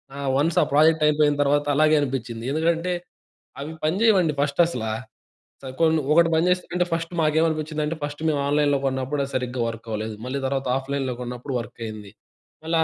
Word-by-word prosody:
ఆ! - - -8 0.2
వన్స్ 165 +5 +1
ఆ - - 0
ప్రాజెక్ట్ 155 +1 +4
అయిపోయిన 150 -1 +3
తర్వాత 145 +1 +2
అలాగే 155 +1 +4
అనిపించింది. 125 -4 -3
ఎందుకంటే, 165 +3 0 0.7
అవి 145 +3 -5
పని 155 +4 +1
చేయవండి 190 -9 +4
ఫస్ట్ 145 +3 +2
అసలా. 110 -8 -3 0.7
స - - -26 0.2
కొన్ని 160 -1 +4
ఒకటి 170 0 +5
పనిచేస్తే 180 +2 +1
అంటే 180 0 +2
ఫస్ట్ 165 +1 -3
మాకేమనిపించిందంటే, 155 0 0
ఫస్ట్ 145 +1 -5
మేము 150 -2 0
ఆన్‌లైన్‌లో 145 -1 +2
కొన్నప్పుడు 130 +2 -2
అది 135 - -10
సరిగ్గా 125 -1 -2
వర్క్‌‌వ్వలేదు. 110 -1 -5
మళ్ళీ 135 +2 -3
తర్వాత 135 -1 -2
ఆఫ్‌లైన్‌లో 135 -1 -3
కొన్నప్పుడు 125 +2 -5
వర్కైంది. 110 -3 -8 0.5
మళ్ళీ 165 +1 0
145 Hz, 160 wpm, -24 LUFS, 130-160 Hz, 0.7 s, ఒకటి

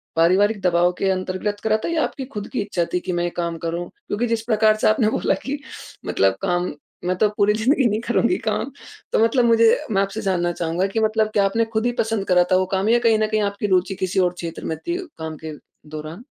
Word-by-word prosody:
पारिवारिक 195 +6 +3
दबाव 175 -1 +3
के 195 - +1
अँतर्गत 185 +2 -2
करा 215 0 +2
था - - -1
या 325 -2 +1
आपकी 265 - -4
ख़ुद 210 -2 -5
की 250 - 0
इच्छा 195 -4 -1
थी 180 - +2
कि 180 - -4
मैं 175 0 0
ये 175 - 0
काम 170 -1 -2
करूँ? 170 +1 -3 0.2
क्योंकि 235 +4 -1
जिस 230 -1 0
प्रकार 215 -2 +3
से 215 - +1
आपने 215 0 +3
बोला - - +1
कि 285 +1 -3 0.5
मतलब 95 0 +2
काम 175 0 0 0.3
मैं 180 +1 +1
तो 210 +2 +3
पूरी 205 0 +4
ज़िंदगी 255 +6 +2
नहीं 210 +1 0
करुँगी 240 +8 +2
काम - - -1 0.4
तो - - +3
मतलब 235 +2 +3
मुझे 230 -1 +5 0.2
मैं 195 -2 +2
आपसे 195 +2 -3
जानना 180 -4 0
चाहूँगा 170 +2 -1
कि 200 +3 -2
मतलब 220 0 +2
क्या 200 -1 +3
आपने 225 +4 +1
ख़ुद 220 +1 0
ही 245 - +2
पसँद 220 -2 0
करा 180 -1 +5
था - - +6
वो 185 - +2
काम 195 +2 +1
या 240 +1 +5
कहीं 230 -2 +3
न 215 - +2
कहीं 215 0 0
आपकी 200 +1 -3
रुचि 190 0 +1
किसी 185 +1 -1
और 180 -1 +2
क्षेत्र 170 -2 -7
में 160 - -2
थी 345 0 -3 0.2
काम 160 -1 -5
के 155 - -5 0.4
दौरान? 155 +7 -7
200 Hz, 240 wpm, -22 LUFS, 180-220 Hz, 0.5 s, था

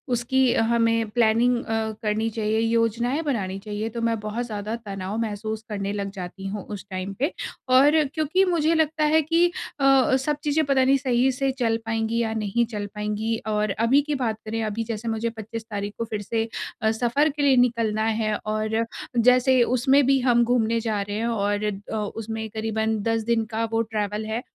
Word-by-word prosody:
उसकी 255 +1 +2
हमें 230 0 +2
planning 235 +2 +3
a, 220 -1 -1
करनी 215 +1 0
चाहिए, 220 0 -1
योजनाएँ 230 +4 +1
बनानी 195 -10 -2
चाहिए 210 +2 -4
तो 230 +1 -5
मैं 230 -1 0
बहुत 215 +3 -3
ज़्यादा 215 0 -4
तनाव 195 +1 -4
महसूस 215 0 -4
करने 200 -1 -3
लग 200 -1 -3
जाती 190 0 -8
हूँ 200 0 -4
उस 200 - -7
टाइम 185 +1 -4
पे 285 +6 +1 0.4
और 290 +4 +6 0.2
क्योंकि 325 +4 +2
मुझे 330 -3 +2
लगता 315 -1 +1
है 310 +1 +4
कि 330 +3 +3 0.3
अ - - -1
अ, 265 -1 +5
सब 290 +2 -1
चीज़ें 305 +1 +2
पता 270 -2 +3
नहीं 270 +1 +4
सही 260 -1 +2
से 270 +1 0
चल 225 -2 +2
पाएँगी 225 +1 -1
या 225 -1 -1
नहीं 220 +2 0
चल 205 -2 -3
पाएँगी 210 +2 -2
और 210 -1 0
अभी 255 +5 +4
की 295 0 -2
बात 230 -5 -1
करें, 225 +1 -3
अभी 215 +1 -2
जैसे 225 0 -5
मुझे 225 +1 -1
25 225 0 -7
तारीख़ 205 0 -4
को 230 - -2
फिर 215 -2 -4
से 225 +2 -1 0.3
अ, 220 - +3
सफर 245 +7 +1
के 295 +1 -4
लिए 270 -2 +5
निकलना 230 -3 +2 0.2
है, 215 -1 0
और 215 +1 0 0.3
जैसे 250 +2 +5
उसमें 260 +3 +3
भी 270 +1 +4
हम 245 -2 +3
घूमने 230 -1 +1
जा 215 -3 -1
रहे 205 +1 -4
हैं 230 +2 -1
और 205 -2 0 0.3
अ, - - -2
उसमें 220 +1 -4
करीबन 220 0 -1
10 225 0 0
दिन 225 0 +1
का 225 +1 +1
वो 225 0 +2
ट्रैवल 215 -1 -3
है। 220 +2 -2
225 Hz, 195 wpm, -24 LUFS, 215-250 Hz, 0.4 s, और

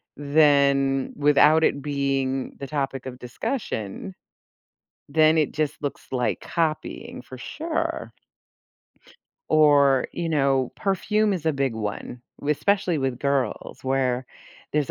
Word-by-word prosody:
then 140 -2 +3
without 150 +2 +5
it 140 - +2
being 135 -2 -1
the 140 - -5
topic 135 -2 -3
of 130 -1 -7
discussion, 115 - -4 0.9
then 155 +2 +4
it 150 - +1
just 155 -1 -2
looks 145 - -5
like 125 -2 0
copying 160 -6 -3
for 130 +1 -11
sure. 315 - -3 1.4
Or, 140 -4 +5
you 170 -1 -3
know, 135 -4 +1
perfume 210 +2 +1
is 170 -4 -3
a 160 - +3
big 135 -3 0
one, 110 +3 -5 0.2
with 150 +1 0
especially 195 -5 +1
with 135 -3 -1
girls, 140 -2 -2
where 130 -1 0 0.5
there's 150 -2 0
140 Hz, 120 wpm, -24 LUFS, 135-155 Hz, 1.4 s, without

